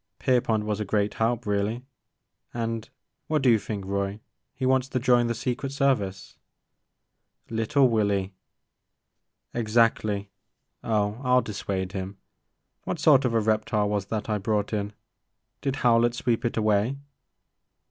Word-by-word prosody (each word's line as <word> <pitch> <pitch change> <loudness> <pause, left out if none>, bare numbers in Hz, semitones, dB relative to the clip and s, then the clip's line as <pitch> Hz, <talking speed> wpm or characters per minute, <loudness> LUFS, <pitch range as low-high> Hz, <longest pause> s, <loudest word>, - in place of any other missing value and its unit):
Pierpont 115 -4 +1
was 105 -1 -2
a - - 0
great 105 0 0
help, 115 +1 0
really, 105 +4 -1 0.4
— - - -49
and, 115 -1 -3 0.4
what 155 -3 0
do 125 - +6
you 110 - +4
think, 105 -1 -5
Roy? 100 +1 -2 0.4
He 130 0 -3
wants 130 0 +2
to 130 - -1
join 120 -1 +3
the 115 - -1
Secret 130 +4 -3
Service! 125 -10 -1 1.1
•' 115 - -6
LitUe 130 +5 +3
Willy 100 -4 0 0.6
!'' - - -52
Exactly. 110 -3 +1 0.5
Oh 105 +1 0
I 125 0 +4
*11 - - -2
dissuade 95 -3 -3
him. 95 0 -5 0.7
What - - -3
sort 145 -4 +5
of 115 -2 0
a - - +4
reptile 110 -1 +1
was 100 -1 -1
that 110 0 -3
I 105 -1 0
brought 105 +1 -1
in? 105 0 -2 0.7
Did 135 -1 -1
Howlett 120 -1 +3
sweep 120 -1 0
it 120 - -1
away? 110 +4 +2
110 Hz, 150 wpm, -26 LUFS, 105-125 Hz, 1.1 s, do